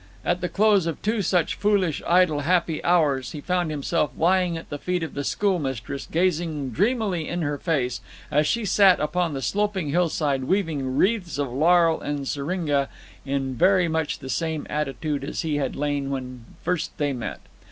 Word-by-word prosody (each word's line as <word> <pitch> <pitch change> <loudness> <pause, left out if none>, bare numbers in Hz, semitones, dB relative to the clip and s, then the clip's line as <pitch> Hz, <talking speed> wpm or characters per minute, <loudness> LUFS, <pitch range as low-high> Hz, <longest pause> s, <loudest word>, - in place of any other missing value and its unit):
At 175 +1 0
the 180 - -1
close 205 -4 +3
of 165 - -3
two 215 +1 +1
such 180 -3 +1
foolish, 200 -7 +1
idle, 175 -4 +4
happy 165 +1 +1
hours 150 -7 +2
he 150 - -5
found 180 +2 -1
himself 150 +1 0
lying 180 0 +2
at 165 - -10
the 145 - -4
feet 180 +1 -1
of 160 - -5
the 145 - -3
schoolmistress, 140 - -2
gazing 160 -5 0
dreamily 200 - 0
in 175 -1 -2
her 145 -1 -2
face, 135 -8 -1 0.3
as 150 +1 +3
she 235 +3 0
sat 195 -1 +5
upon 165 0 0
the 135 - -4
sloping 205 -6 0
hillside 150 -4 +1
weaving 150 -8 -1
wreaths 195 -6 +1
of 140 -4 -2
laurel 165 +3 +4
and 145 -2 -3
syringa, 145 -1 -1 0.4
in 135 -1 -1
very 185 +6 +4
much 160 -2 -1
the 130 - -9
same 160 +1 -2
attitude 150 0 -2
as 140 - -3
he 155 -2 -1
had 135 -3 -2
lain 145 -1 -1
when 130 -3 -5 0.2
first 175 -2 -2
they 145 -2 0
met. 120 -5 -5
160 Hz, 175 wpm, -24 LUFS, 140-180 Hz, 0.4 s, sat